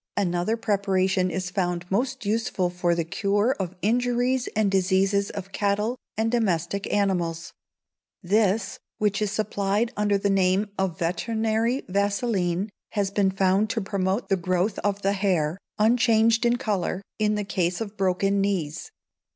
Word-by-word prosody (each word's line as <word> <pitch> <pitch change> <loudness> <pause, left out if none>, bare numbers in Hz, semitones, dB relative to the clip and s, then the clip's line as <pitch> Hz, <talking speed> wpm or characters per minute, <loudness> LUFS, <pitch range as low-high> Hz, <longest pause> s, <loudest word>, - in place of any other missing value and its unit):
Another 180 +3 0
preparation 190 -3 +1
is 180 +1 -3
found 175 -2 -1
most 255 +4 -1
useful 205 -4 0
for 175 -1 0
the 170 - 0
cure 205 +8 +1
of 185 -1 -3
injuries 245 +3 +1
and 210 -2 +2
diseases 195 +1 +2
of 195 -1 -7
cattle 210 +4 0 0.2
and 225 +1 +1
domestic 200 -4 0
animals. 175 -5 0 0.7
This, 200 +2 +1 0.2
which 210 -1 0
is 210 - +1
supplied 210 +1 0
under 205 -1 +2
the 200 0 0
name 195 +2 +2
of 190 -4 -1
Veterinary 225 +7 0
Vaseline, 200 -1 0 0.2
has 200 -2 0
been 200 -1 +2
found 195 +2 +2
to 225 - -1
promote 195 +1 -1
the 195 -1 +2
growth 185 +3 0
of 200 -1 -1
the 195 +1 +2
hair, 185 -4 0 0.2
unchanged 230 +1 +3
in 240 - +3
colour, 200 -5 -2 0.2
in 210 0 +2
the 210 - -1
case 180 -2 -1
of 215 -2 -5
broken 195 +1 +1
knees. 185 - -2
200 Hz, 145 wpm, -25 LUFS, 185-215 Hz, 0.7 s, unchanged